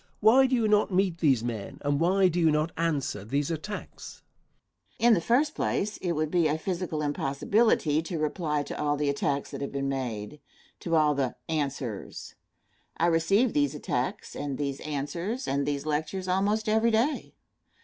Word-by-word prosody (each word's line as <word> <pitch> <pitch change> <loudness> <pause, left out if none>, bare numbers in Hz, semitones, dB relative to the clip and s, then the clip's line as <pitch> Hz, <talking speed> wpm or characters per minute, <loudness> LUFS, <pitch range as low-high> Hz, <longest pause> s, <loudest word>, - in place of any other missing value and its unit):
Why 250 +5 +6
do 255 - +1
you 230 -3 +2
not 210 0 +3
meet 185 -2 +1
these 135 -9 +3
men, 115 -4 -5
and 145 0 +1
why 185 +3 +4
do 175 0 -1
you 165 -2 +4
not 155 +1 +1
answer 150 -11 -1
these 140 +8 -1
attacks? 185 +6 -7 0.8
Answer. 235 - +4
In 240 - +7
the 180 - +2
first 275 - +2
place, 210 +2 -1
it 175 -2 -2
would 155 -1 -1
be 175 -3 +3
a 150 +1 0
physical 170 -2 -3
impossibility 150 +3 +1
to 165 +1 -5
reply 150 -1 -1
to 145 - -6
all 145 0 +1
the 145 -1 +1
attacks 140 0 -2
that - - -6
have 140 - -3
been 140 0 -2
made 125 -1 -4 0.4
to 165 -1 -1
all 155 -2 +4
the 135 -3 -1
"answers." 140 - -4 0.6
I 170 - +2
receive 195 +8 +3
these 145 0 +1
attacks, 125 -3 -3
and 140 -2 -4
these 140 -2 -3
answers, 170 - -4
and 140 +1 0
these 145 0 -2
lectures 160 +5 -2
almost 205 +4 +1
every 220 +2 +3
day. 230 +7 0
155 Hz, 180 wpm, -28 LUFS, 140-190 Hz, 0.8 s, In